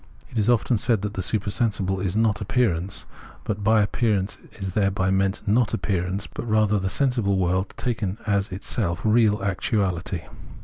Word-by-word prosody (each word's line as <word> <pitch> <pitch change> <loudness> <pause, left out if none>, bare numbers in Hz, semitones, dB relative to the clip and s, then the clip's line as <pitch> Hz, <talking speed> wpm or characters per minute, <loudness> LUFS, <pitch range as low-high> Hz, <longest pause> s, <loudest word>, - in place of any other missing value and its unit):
It 115 - -2
is 105 - +2
often 120 0 +3
said 110 -4 +1
that 105 0 -3
the 95 - -3
supersensible 100 -1 0
is 95 0 -2
not 110 -1 +2
appearance; 100 -4 0 0.4
but 105 -1 -3
by 110 0 +4
appearance 105 -3 0
is 95 -3 -5
thereby 100 -2 +1
meant 95 +1 +1
not 115 +2 +3
appearance, 95 -1 -1
but 120 - -7
rather 105 -1 +3
the 95 0 -1
sensible 115 -4 +1
world 95 +1 0
taken 110 -5 -2
as 100 -2 +1
itself 95 -2 -2
real 110 -2 +3
actuality. 95 -2 -1
100 Hz, 160 wpm, -24 LUFS, 95-110 Hz, 0.4 s, by